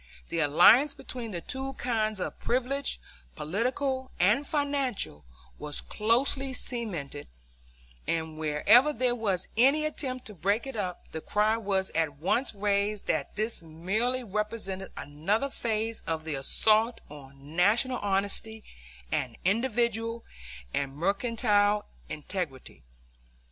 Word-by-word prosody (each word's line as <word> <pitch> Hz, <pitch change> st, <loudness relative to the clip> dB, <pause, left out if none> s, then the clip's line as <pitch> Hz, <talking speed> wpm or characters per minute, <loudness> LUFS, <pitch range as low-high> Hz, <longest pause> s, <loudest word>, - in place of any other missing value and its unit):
The 170 Hz, -, -1 dB
alliance 225 Hz, -, +6 dB
between 240 Hz, -3 st, -6 dB
the 175 Hz, -5 st, -4 dB
two 265 Hz, +7 st, -4 dB
kinds 220 Hz, -5 st, -1 dB
of -, -, -4 dB
privilege, 260 Hz, +3 st, 0 dB, 0.4 s
political 260 Hz, -, -1 dB
and 215 Hz, +11 st, +3 dB
financial, 280 Hz, -, -1 dB, 0.4 s
was 150 Hz, -1 st, -2 dB
closely 260 Hz, +5 st, +1 dB
cemented; 185 Hz, -, -5 dB, 0.8 s
and 160 Hz, -1 st, -1 dB
wherever 160 Hz, -, +5 dB
there 250 Hz, -1 st, +1 dB
was 200 Hz, -6 st, -1 dB
any 275 Hz, +7 st, +4 dB
attempt 260 Hz, -4 st, -3 dB
to 210 Hz, -, -7 dB
break 200 Hz, -, 0 dB
it 270 Hz, -2 st, -6 dB
up, 185 Hz, -4 st, -4 dB
the 160 Hz, -, -5 dB
cry 210 Hz, +5 st, +2 dB
was 195 Hz, -4 st, 0 dB
at 160 Hz, -2 st, 0 dB
once 205 Hz, -, +1 dB
raised 200 Hz, 0 st, 0 dB
that -, -, -1 dB
this 215 Hz, 0 st, -1 dB
merely 200 Hz, +11 st, -1 dB
represented 210 Hz, -2 st, -3 dB
another 200 Hz, -, -1 dB
phase 225 Hz, -1 st, -2 dB
of 160 Hz, -1 st, -2 dB
the 160 Hz, -, -3 dB
assault 215 Hz, -, +3 dB
on 140 Hz, +1 st, -13 dB
National 225 Hz, +8 st, +3 dB
honesty 205 Hz, +2 st, -1 dB, 0.5 s
and 125 Hz, -3 st, -1 dB
individual 230 Hz, +1 st, +1 dB, 0.5 s
and 135 Hz, -1 st, -2 dB
mercantile 205 Hz, -, +2 dB, 0.2 s
integrity. 155 Hz, -4 st, -5 dB
210 Hz, 120 wpm, -29 LUFS, 175-245 Hz, 0.8 s, alliance